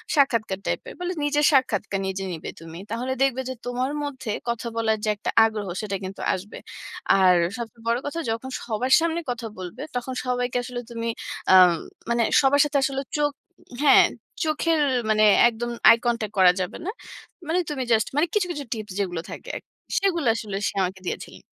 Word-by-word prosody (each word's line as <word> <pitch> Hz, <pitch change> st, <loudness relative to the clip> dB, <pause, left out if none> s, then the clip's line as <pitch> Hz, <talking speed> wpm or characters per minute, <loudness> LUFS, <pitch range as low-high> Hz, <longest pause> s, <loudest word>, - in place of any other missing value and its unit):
সাক্ষাৎকার 230 Hz, -9 st, +2 dB
টাইপ -, -, -1 dB
এর। -, -, -7 dB
বলে 360 Hz, +1 st, -2 dB
নিজের 295 Hz, 0 st, +2 dB
সাক্ষাৎকার 230 Hz, -8 st, +1 dB
নিজে 190 Hz, 0 st, -3 dB
নিবে 165 Hz, 0 st, -6 dB
তুমি। 165 Hz, 0 st, -10 dB
তাহলে 250 Hz, +3 st, -2 dB
দেখবে 260 Hz, -1 st, +1 dB
যে, 260 Hz, -, -2 dB
তোমার 250 Hz, +2 st, -1 dB
মধ্যে 260 Hz, -5 st, -4 dB, 0.2 s
কথা 235 Hz, 0 st, -2 dB
বলার 220 Hz, -1 st, +1 dB
যে -, -, +1 dB
একটা 205 Hz, -, -4 dB, 0.2 s
আগ্রহ 215 Hz, -2 st, -3 dB, 0.2 s
সেটা 200 Hz, -2 st, -2 dB
কিন্তু 190 Hz, +1 st, -7 dB
আসবে। 195 Hz, +3 st, -6 dB, 0.6 s
আর 185 Hz, -1 st, +6 dB, 0.2 s
সবচেয়ে 230 Hz, -1 st, -8 dB
বড় 235 Hz, +1 st, +2 dB
কথা 290 Hz, +3 st, -3 dB
যখন 230 Hz, +4 st, -4 dB, 0.2 s
সবার 245 Hz, +3 st, 0 dB
সামনে 335 Hz, 0 st, 0 dB
কথা 240 Hz, -1 st, -5 dB
বলবে, 180 Hz, -2 st, -7 dB
তখন 245 Hz, +1 st, -3 dB
সবাইকে 245 Hz, 0 st, -1 dB
আসলে 245 Hz, 0 st, -5 dB
তুমি 230 Hz, 0 st, -4 dB, 0.5 s
আ -, -, +9 dB, 0.2 s
ম -, -, +1 dB, 0.4 s
মানে 235 Hz, 0 st, +2 dB, 0.2 s
সবার 280 Hz, +1 st, +4 dB
সাথে 295 Hz, -1 st, 0 dB
আসলে 270 Hz, 0 st, 0 dB, 0.2 s
চোখ, 295 Hz, -1 st, +2 dB, 0.5 s
হ্যাঁ, 290 Hz, -, +7 dB, 0.4 s
চোখের 315 Hz, +1 st, +1 dB, 0.3 s
মানে 215 Hz, 0 st, +4 dB, 0.3 s
একদম 240 Hz, +1 st, -5 dB, 0.2 s
আই 230 Hz, -, +8 dB
কনট্যাক্ট 230 Hz, -3 st, -1 dB
করা 185 Hz, -1 st, +8 dB
যাবে 180 Hz, -, -4 dB
না। -, -, -2 dB, 0.6 s
মানে 335 Hz, +3 st, +1 dB
তুমি 280 Hz, -3 st, -2 dB
জাস্ট 220 Hz, -2 st, +3 dB
মানে 305 Hz, +4 st, +3 dB
কিছু, 405 Hz, -4 st, +2 dB
কিছু 295 Hz, -4 st, -4 dB
টিপস 215 Hz, -3 st, -7 dB
যেগুলো 175 Hz, -4 st, -2 dB
থাকে -, -, -8 dB
আরকি। -, -, -10 dB, 0.3 s
সেগুলা 340 Hz, -8 st, +1 dB
আসলে 215 Hz, -4 st, -5 dB
সে -, -, -3 dB
আমাকে 185 Hz, +1 st, -3 dB
দিয়েছিলেন। -, -, -6 dB
240 Hz, 185 wpm, -24 LUFS, 215-275 Hz, 0.6 s, আ